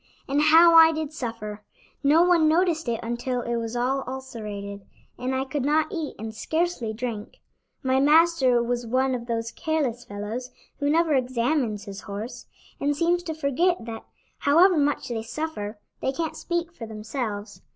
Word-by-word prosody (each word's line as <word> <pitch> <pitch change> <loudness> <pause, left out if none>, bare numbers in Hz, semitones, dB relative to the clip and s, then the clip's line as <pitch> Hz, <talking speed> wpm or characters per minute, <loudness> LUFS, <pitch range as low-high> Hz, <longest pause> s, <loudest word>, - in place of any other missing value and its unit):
"And 280 +2 +1
how 325 +2 +7
I 325 0 +9
did 310 -1 -4
suffer! 220 -6 -5 0.4
No 305 +4 +5
one 345 -3 +4
noticed 325 -3 +2
it 230 - -1
until 240 +2 -2
it 235 0 -1
was 230 0 -4
all 260 +3 0
ulcerated, 210 -6 -6 0.4
and 255 +1 -1
I 265 +1 -1
could 275 0 -3
not 305 +5 +2
eat 325 -6 -4
and 220 +1 -6
scarcely 315 -1 -1
drink. 220 -2 -5 0.5
My 260 0 +2
master 290 -4 +4
was 240 0 -2
one 260 +3 +1
of 240 -1 -4
those 230 -1 -2
careless 285 -7 -1
fellows 220 +3 -5 0.3
who 285 0 +1
never 325 0 +3
examines 250 -3 0
his 200 -1 -8
horse, 205 +4 -7 0.3
and 285 0 0
seems 345 +2 +2
to 325 -3 -5
forget 315 0 +1
that, 225 -1 -7 0.4
however 345 +6 +5
much 290 -3 0
they 230 -2 -2
suffer, 225 -4 -5 0.2
they 265 - 0
can't 320 +3 -3
speak 345 0 -3
for 230 -9 -8
themselves. 215 -1 -5
260 Hz, 165 wpm, -25 LUFS, 230-315 Hz, 0.5 s, I